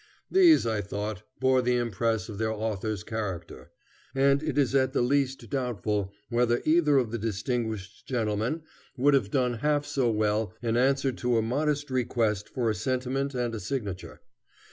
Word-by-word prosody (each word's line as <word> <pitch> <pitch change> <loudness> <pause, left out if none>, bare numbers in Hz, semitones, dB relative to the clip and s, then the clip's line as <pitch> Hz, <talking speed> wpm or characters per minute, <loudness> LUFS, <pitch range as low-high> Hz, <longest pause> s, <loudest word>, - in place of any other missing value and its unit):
These, 360 -4 +6
I 110 -2 0
thought, 100 +1 -4 0.2
bore 130 -1 +3
the 125 0 +1
impress 115 -1 -1
of 105 -3 -7
their 110 0 0
authors' 110 -2 -3
character, 90 - -5 0.5
and 140 +1 +4
it 155 -3 -3
is 135 -3 +2
at 130 -1 +2
the - - +2
least 135 +1 0
doubtful 105 -7 -1 0.2
whether 120 0 +2
either 155 -3 +4
of 120 -5 +1
the 115 - -3
distinguished 110 -1 -3
gentlemen 115 +5 -1 0.3
would 140 +3 +4
have 130 -8 +2
done 125 -2 0
half 145 +2 +1
so 140 -4 +1
well 105 0 0
in 115 0 -1
answer 135 +2 +2
to 120 -1 0
a 110 - +2
modest 145 +4 -1
request 115 -5 0
for 120 -3 -1
a 110 - +2
sentiment 130 +3 -2
and 120 -2 -1
a 110 - -3
signature. 100 -3 -5
120 Hz, 165 wpm, -28 LUFS, 110-135 Hz, 0.5 s, These